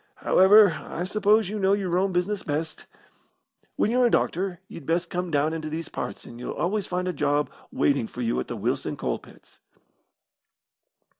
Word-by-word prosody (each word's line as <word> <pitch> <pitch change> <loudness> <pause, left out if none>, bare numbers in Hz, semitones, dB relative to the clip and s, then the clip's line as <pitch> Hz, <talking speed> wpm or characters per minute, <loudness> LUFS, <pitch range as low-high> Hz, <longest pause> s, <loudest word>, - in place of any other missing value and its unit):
However, 200 0 +6
I 175 - -5
suppose 210 +2 +2
you 210 +1 -3
know 195 0 +3
your 190 -4 0
own 190 +2 +2
business 185 +3 -1
best. 155 +2 -4 0.9
When 215 - +1
you're 250 0 +4
a - - +2
doctor, 185 -4 0
you'd 155 - -11
best 170 +1 0
come 180 0 -2
down 150 +1 +1
into 155 -1 -4
these 160 +1 -5
parts, - - -6
and 120 - -11
you'll 125 - -5
always 200 +3 -1
find 180 0 -2
a 180 - -1
job 145 0 0 0.2
waiting 140 -5 +1
for 125 - -6
you 115 - 0
at 65 - -4
the - - -5
Wilson - - -2
Coal - - -2
pits." - - -19
180 Hz, 180 wpm, -25 LUFS, 155-195 Hz, 0.9 s, However